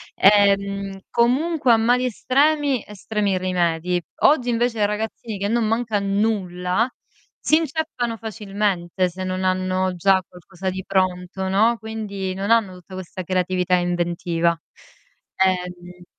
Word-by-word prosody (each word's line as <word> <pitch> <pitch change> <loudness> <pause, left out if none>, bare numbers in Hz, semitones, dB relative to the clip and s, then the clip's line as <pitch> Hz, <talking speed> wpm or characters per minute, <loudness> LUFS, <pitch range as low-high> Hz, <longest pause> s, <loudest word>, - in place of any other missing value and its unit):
Ehm, 200 -1 +3
comunque 260 +2 +2
a - - +5
mali 245 +3 +2
estremi, 280 +2 +2
estremi 210 -1 -2
rimedi. 180 -1 0 0.2
Oggi 255 -5 +4
invece 235 -1 0
i - - +5
ragazzini, 215 +1 -4
che 200 +1 -2
non 230 0 +1
manca 225 -1 0
nulla, 200 0 0 0.5
si 310 - +3
inceppano 310 -7 -2
facilmente 200 -5 -2
se 185 +2 -7
non 185 0 -2
hanno 185 0 0
già 190 +2 +3
qualcosa 185 +1 -7
di 190 +1 -5
pronto, 185 0 -1
no. 220 +5 +3
Quindi 210 -4 -5
non 200 +3 -2
hanno 225 -5 +3
tutta 180 +1 -14
questa 185 0 -6
creatività 180 0 +1
e 180 - +2
inventiva. 170 -1 0 0.9
Ehm 180 -1 -3
195 Hz, 130 wpm, -22 LUFS, 185-225 Hz, 0.9 s, a